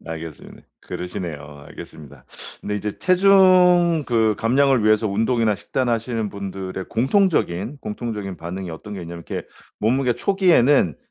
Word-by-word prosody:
알겠습니다. 80 Hz, -2 st, -9 dB, 0.2 s
그러시네요. 75 Hz, -5 st, -7 dB
알겠습니다. 70 Hz, -4 st, -12 dB, 0.4 s
근데 105 Hz, 0 st, -3 dB
이제 105 Hz, 0 st, -4 dB
체중 180 Hz, -4 st, +4 dB
그 110 Hz, -3 st, +2 dB
감량을 130 Hz, 0 st, +2 dB
위해서 110 Hz, 0 st, +3 dB
운동이나 110 Hz, +1 st, +1 dB
식단하시는 115 Hz, -2 st, -2 dB
분들의 95 Hz, -1 st, -6 dB
공통적인, 130 Hz, -, 0 dB
공통적인 105 Hz, -3 st, -5 dB
반응이 90 Hz, +1 st, -6 dB
어떤 105 Hz, +6 st, -8 dB
게 95 Hz, -, -7 dB
있냐면 85 Hz, 0 st, -9 dB
이렇게 -, -, -5 dB, 0.3 s
몸무게 125 Hz, +2 st, +1 dB
초기에는 145 Hz, -, +3 dB
110 Hz, 360 characters per minute, -21 LUFS, 95-135 Hz, 0.4 s, 체중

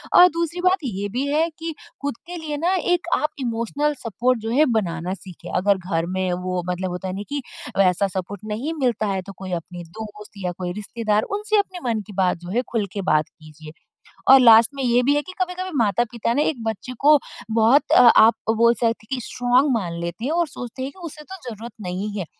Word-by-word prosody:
और 360 Hz, -, +10 dB
दूसरी 335 Hz, +1 st, -2 dB
बात 365 Hz, +1 st, +4 dB
ये 205 Hz, -6 st, -3 dB
भी 250 Hz, +7 st, -2 dB
है 310 Hz, +4 st, +2 dB
कि 325 Hz, 0 st, -4 dB, 0.3 s
खुद 285 Hz, -3 st, -2 dB
के 355 Hz, -, -6 dB
लिए 310 Hz, -3 st, -4 dB
ना 345 Hz, +5 st, +1 dB, 0.2 s
एक 350 Hz, -1 st, +1 dB
आप 300 Hz, -, +1 dB
इमोशनल 250 Hz, +4 st, -1 dB
सपोर्ट 240 Hz, +2 st, 0 dB
जो 225 Hz, -, -4 dB
है 290 Hz, +6 st, +4 dB
बनाना 175 Hz, -3 st, -2 dB
सीखें। 185 Hz, -2 st, -10 dB
अगर 200 Hz, +1 st, +3 dB
घर 175 Hz, -3 st, -2 dB
में 185 Hz, -1 st, 0 dB
वो 185 Hz, 0 st, -1 dB
मतलब 180 Hz, +1 st, -2 dB
होता 180 Hz, +1 st, -5 dB
है 185 Hz, -, -3 dB
नहीं 205 Hz, +1 st, -5 dB
कि 285 Hz, 0 st, -2 dB, 0.4 s
वैसा 195 Hz, 0 st, +3 dB
सपोर्ट 190 Hz, +1 st, -5 dB
नहीं 270 Hz, +10 st, -3 dB
मिलता 235 Hz, -4 st, +1 dB
है 195 Hz, -1 st, -1 dB
तो 200 Hz, -, -7 dB
कोई 190 Hz, -1 st, -7 dB
अपने 175 Hz, +1 st, -10 dB, 0.2 s
दोस्त 210 Hz, -1 st, -9 dB
या 180 Hz, -, -1 dB
कोई 180 Hz, -1 st, -3 dB
रिश्तेदार 210 Hz, +1 st, -1 dB
उनसे 425 Hz, +1 st, 0 dB
अपने 375 Hz, -3 st, -3 dB
मन 220 Hz, -2 st, 0 dB
की 210 Hz, -, -10 dB
बात 185 Hz, -2 st, +2 dB
जो 175 Hz, +1 st, -10 dB
है 235 Hz, +5 st, +1 dB
खुल 225 Hz, -4 st, 0 dB
के 200 Hz, -, -3 dB
बात 155 Hz, 0 st, +3 dB
कीजिए 155 Hz, 0 st, -14 dB, 0.6 s
और 270 Hz, -, +9 dB
लास्ट 230 Hz, -1 st, +8 dB
में 275 Hz, -, -3 dB
ये 245 Hz, 0 st, +3 dB
भी 285 Hz, +3 st, +3 dB
है 290 Hz, -, +2 dB
कि 370 Hz, +5 st, -10 dB
कभी-कभी 370 Hz, +1 st, -2 dB
माता 205 Hz, +2 st, +2 dB
पिता 235 Hz, -1 st, -1 dB
ना 285 Hz, -, +2 dB
एक 275 Hz, -6 st, -1 dB
बच्चे 225 Hz, +3 st, -4 dB
को 295 Hz, +1 st, +6 dB, 0.3 s
बहुत 230 Hz, +6 st, +4 dB
अ 245 Hz, -, +8 dB
आप 225 Hz, +2 st, +8 dB, 0.2 s
बोल 235 Hz, +1 st, +5 dB
सकते 235 Hz, +1 st, -2 dB, 0.3 s
हैं -, -, +1 dB
कि 250 Hz, -, -5 dB
स्ट्राँग 250 Hz, +3 st, +2 dB
मान 175 Hz, -6 st, -3 dB
लेते 170 Hz, +6 st, -4 dB
हैं 285 Hz, -, -1 dB
और 340 Hz, 0 st, +1 dB
सोचते 255 Hz, -2 st, -7 dB
हैं 270 Hz, -, -4 dB
कि 375 Hz, -, -19 dB
उसे 300 Hz, -, -12 dB
तो 380 Hz, +5 st, -9 dB
ज़रूरत 225 Hz, +1 st, -8 dB, 0.2 s
नहीं 190 Hz, +4 st, -3 dB
है। 185 Hz, -, -3 dB
230 Hz, 230 wpm, -22 LUFS, 190-285 Hz, 0.6 s, और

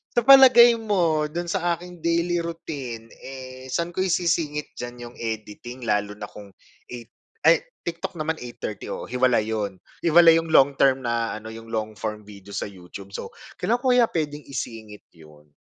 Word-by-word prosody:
sa 240 Hz, -, +4 dB
palagay 255 Hz, -3 st, +8 dB
mo, 175 Hz, -9 st, +1 dB
do'n 175 Hz, +2 st, -4 dB
sa 175 Hz, 0 st, 0 dB
aking 180 Hz, +1 st, -11 dB
daily 170 Hz, +1 st, +1 dB
routine, 140 Hz, -9 st, -6 dB
eh, 130 Hz, -1 st, -9 dB
saan 170 Hz, +6 st, -2 dB
ko 185 Hz, -, -1 dB
isisingit 165 Hz, -5 st, 0 dB
diyan 120 Hz, 0 st, -7 dB
'yong 120 Hz, -, -19 dB
editing 115 Hz, +2 st, -6 dB
lalo 105 Hz, -1 st, 0 dB
na 105 Hz, -, -6 dB
kung 100 Hz, -1 st, -12 dB, 0.4 s
8 120 Hz, -2 st, -9 dB, 0.4 s
ay -, -, +6 dB, 0.2 s
TikTok 170 Hz, +2 st, -4 dB
naman 160 Hz, +1 st, -2 dB
8:30, 120 Hz, -4 st, -7 dB
oo, -, -, -5 dB
hiwalay 125 Hz, -3 st, +2 dB
'yon. 105 Hz, -3 st, -3 dB, 0.3 s
Hiwalay 165 Hz, 0 st, +7 dB
'yong 165 Hz, 0 st, -6 dB
long 140 Hz, +1 st, +6 dB
term 135 Hz, -1 st, +4 dB
na 115 Hz, -1 st, -1 dB
ano, 110 Hz, +1 st, -9 dB
'yong 115 Hz, 0 st, -11 dB
long 110 Hz, -1 st, -3 dB
form 105 Hz, -1 st, -4 dB
video 100 Hz, -1 st, -13 dB
sa -, -, -2 dB
YouTube. 95 Hz, +1 st, -11 dB
So, -, -, -6 dB, 0.3 s
kailan 235 Hz, -, +2 dB
ko 260 Hz, -, +2 dB
kaya 245 Hz, -2 st, +5 dB
puwedeng 150 Hz, -2 st, -3 dB
isingit 110 Hz, -6 st, -7 dB
'yon? 75 Hz, -3 st, -19 dB
130 Hz, 170 wpm, -24 LUFS, 110-170 Hz, 0.4 s, palagay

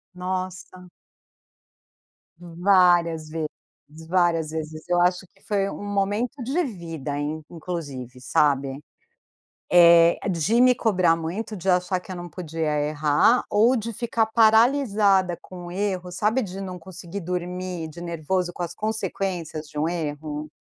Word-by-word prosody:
Nossa. 185 Hz, 0 st, -5 dB, 1.5 s
Várias 175 Hz, -2 st, +2 dB
vezes, 160 Hz, 0 st, -3 dB, 0.6 s
várias 170 Hz, -3 st, +2 dB
vezes. 155 Hz, 0 st, -6 dB
Eu 175 Hz, -, +3 dB
acho 180 Hz, +1 st, +2 dB
que 195 Hz, -, -28 dB
foi 200 Hz, -1 st, 0 dB
um -, -, -7 dB
momento 205 Hz, +6 st, -1 dB
de 285 Hz, +9 st, 0 dB
vida 165 Hz, -, -6 dB, 0.4 s
inclusive, 145 Hz, -8 st, -6 dB
sabe, 135 Hz, 0 st, +1 dB, 0.9 s
eh, 170 Hz, -1 st, +7 dB
de 190 Hz, +7 st, +2 dB
me 250 Hz, 0 st, +6 dB
cobrar 185 Hz, -8 st, +2 dB
muito, 180 Hz, +7 st, -4 dB
de 185 Hz, +1 st, -7 dB
achar 180 Hz, 0 st, +2 dB
que 185 Hz, -, -11 dB
eu -, -, -5 dB
não 175 Hz, 0 st, -7 dB
podia 160 Hz, -3 st, -2 dB
errar 150 Hz, +10 st, +3 dB
ou 225 Hz, +5 st, +4 dB
de 230 Hz, -1 st, -3 dB
ficar 225 Hz, 0 st, 0 dB
paralisada 220 Hz, -5 st, +4 dB
com 175 Hz, -1 st, -10 dB
erros, 185 Hz, -2 st, -3 dB
sabe, 220 Hz, +6 st, +1 dB
de 195 Hz, 0 st, -7 dB
não 185 Hz, -2 st, -6 dB, 0.4 s
dormir 180 Hz, -1 st, -4 dB
de 165 Hz, +3 st, -10 dB
nervoso 175 Hz, +2 st, -2 dB
com 175 Hz, -, -8 dB
as 175 Hz, 0 st, -4 dB
consequências 190 Hz, -7 st, -3 dB
de 150 Hz, 0 st, -6 dB
um 160 Hz, -, +1 dB
erro? 150 Hz, -2 st, -4 dB
180 Hz, 130 wpm, -24 LUFS, 165-200 Hz, 1.5 s, eh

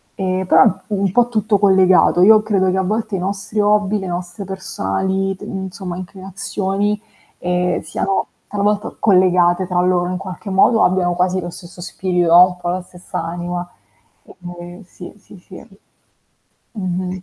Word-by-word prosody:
Ehm, 185 Hz, -1 st, -2 dB
però, -, -, +6 dB
mhmm, 185 Hz, -, +3 dB
un 200 Hz, -3 st, -1 dB
po' 245 Hz, +3 st, +3 dB
tutto 215 Hz, -3 st, +1 dB
collegato. 190 Hz, -2 st, +4 dB
Io 215 Hz, +2 st, +7 dB
credo 190 Hz, -3 st, +1 dB
che 190 Hz, -, -1 dB
a 190 Hz, -, +1 dB
volte 215 Hz, +1 st, -2 dB
i -, -, -2 dB
nostri 200 Hz, +3 st, -3 dB
hobby, 210 Hz, 0 st, +2 dB
le 190 Hz, -, -6 dB
nostre 175 Hz, +3 st, -5 dB
personali 190 Hz, -, -2 dB
t -, -, -25 dB
insomma, 190 Hz, -2 st, -6 dB
inclinazioni, 195 Hz, +2 st, -3 dB, 0.4 s
ehm, 180 Hz, 0 st, 0 dB
siano 190 Hz, +4 st, -2 dB, 0.2 s
talvolta 205 Hz, +1 st, -1 dB
collegate 180 Hz, -2 st, +3 dB
tra 180 Hz, -1 st, +1 dB
loro 180 Hz, -1 st, +1 dB
in 180 Hz, -, -2 dB
qualche 195 Hz, +2 st, -8 dB
modo 195 Hz, +4 st, +4 dB
o -, -, +4 dB
abbiano 180 Hz, -1 st, +1 dB
quasi 180 Hz, +1 st, 0 dB
lo 175 Hz, -, -5 dB
stesso 175 Hz, 0 st, -12 dB
spirito 180 Hz, -1 st, -1 dB
o 180 Hz, +1 st, +9 dB
un 180 Hz, -1 st, -8 dB
po' 175 Hz, -1 st, -4 dB
la 185 Hz, +1 st, -2 dB
stessa 180 Hz, -1 st, -7 dB
anima. 175 Hz, +1 st, -4 dB, 0.6 s
Ehm, 175 Hz, +1 st, -11 dB
sì, 180 Hz, 0 st, -12 dB
sì, 195 Hz, -, -16 dB
sì. 185 Hz, -, -13 dB, 1.1 s
Mh-mh. 185 Hz, -2 st, -4 dB
185 Hz, 165 wpm, -18 LUFS, 180-195 Hz, 1.1 s, o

